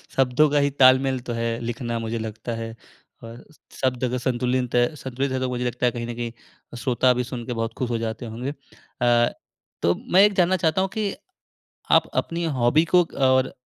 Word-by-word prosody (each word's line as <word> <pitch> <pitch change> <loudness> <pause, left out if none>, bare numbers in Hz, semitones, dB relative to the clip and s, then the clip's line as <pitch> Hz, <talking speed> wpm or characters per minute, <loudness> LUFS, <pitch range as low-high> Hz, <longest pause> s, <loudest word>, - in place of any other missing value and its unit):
शब्दों 135 +3 +3
का 145 - +1
ही - - +2
तालमेल 130 0 +5
तो - - -1
है 115 0 -2
लिखना 120 0 -3
मुझे 115 0 -3
लगता 110 +1 -6
है। 115 0 -6 0.5
और 115 +1 -10 0.3
शब्द 130 -1 -1
अगर 125 0 0
संतुलिंत 125 0 -1
है 120 +5 +2
संतुलित 130 -1 -3
है 130 - -1
तो 130 0 -1
मुझे 125 0 -2
लगता 125 0 -1
है 120 - +3
कहीं 120 0 -5
न 120 - -4
कहीं 120 0 -4 0.5
श्रोता 125 0 +2
भी 125 0 -1
सुनके 125 0 -5
बहुत 115 -1 -3
खुश 125 - -2
हो 120 - 0
जाते 115 +1 -4
होंगे। 120 +4 -5 0.5
अ, 120 -1 +4 0.5
तो 85 - +3 0.2
मैं 185 - +8
एक 205 0 +4
जानना 180 +1 +4
चाहता 160 +3 +2
हूँ 190 - 0
कि 210 -2 -1 0.8
आप - - +3
अपनी 170 +1 -4
हॉबी 120 +7 +4
को 180 - +8 0.2
और 130 0 +3
125 Hz, 200 wpm, -23 LUFS, 120-130 Hz, 0.8 s, मैं